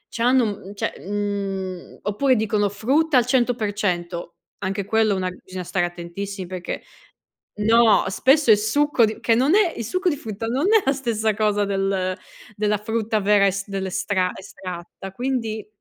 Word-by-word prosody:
c'hanno, 245 +2 +3
uhm, 200 -2 -4
cioè, - - -2
mhmm 200 -1 -2 0.4
oppure 255 +6 +2
dicono 210 -2 +1
frutta 275 +8 +2
al 245 - +4
100%, 205 -9 -1 0.2
anche 195 0 -3
quello 220 -1 +2
una 185 -1 -1
bisogna 185 0 -8
stare 175 0 0
attentissimi 180 +3 -6
perché 180 -1 -5 0.8
No! 225 +1 +5
Spesso 265 +7 +4
è 215 - +9
succo 240 +5 +2
di 215 0 +1
che 230 - +2
non 270 - +3
è 390 -6 +3
il 230 - -4
succo 370 - 0
di 295 - 0
frutta 220 -4 -6
non 260 +8 0
è 440 -3 +5
la 270 - +3
stessa 225 -5 0
cosa 205 -1 +1
del 195 -2 -1 0.4
della 210 0 +1
frutta 220 +1 -1
vera 200 0 +4
es 195 +1 -2
dell'estra 190 -1 -1
estratta, 185 0 -8
quindi. 230 -1 -3
210 Hz, 155 wpm, -22 LUFS, 195-235 Hz, 0.8 s, è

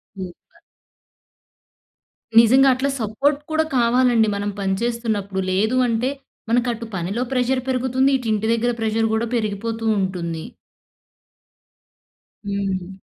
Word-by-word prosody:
Super. 185 -2 -10 1.8
నిజంగా 260 +4 +6
అట్లా 265 +2 -1
support 275 +7 0
కూడా 315 0 +2
కావాలండి. 240 -1 +3
మనం 200 0 -2
పని 195 -1 0
చేస్తున్నప్పుడు. 220 -5 -2
లేదు 215 +7 +1
అంటే 235 +2 0 0.4
మనకు 240 +1 +2
అటు 230 0 -7
పనిలో 190 +6 -2
ప్రెషర్ 255 0 +1
పెరుగుతుంది. 260 +1 +1
ఇటు 250 -3 -7
ఇంటి 215 +1 -1
దగ్గర 235 +1 +1
ప్రెషర్ 225 0 +1
కూడా 220 +1 +1
పెరిగిపోతూ 225 +1 -2
ఉంటుంది. 170 -4 -3 2.0
హ్మ్. 195 -2 -3
225 Hz, 110 wpm, -21 LUFS, 200-245 Hz, 2.0 s, నిజంగా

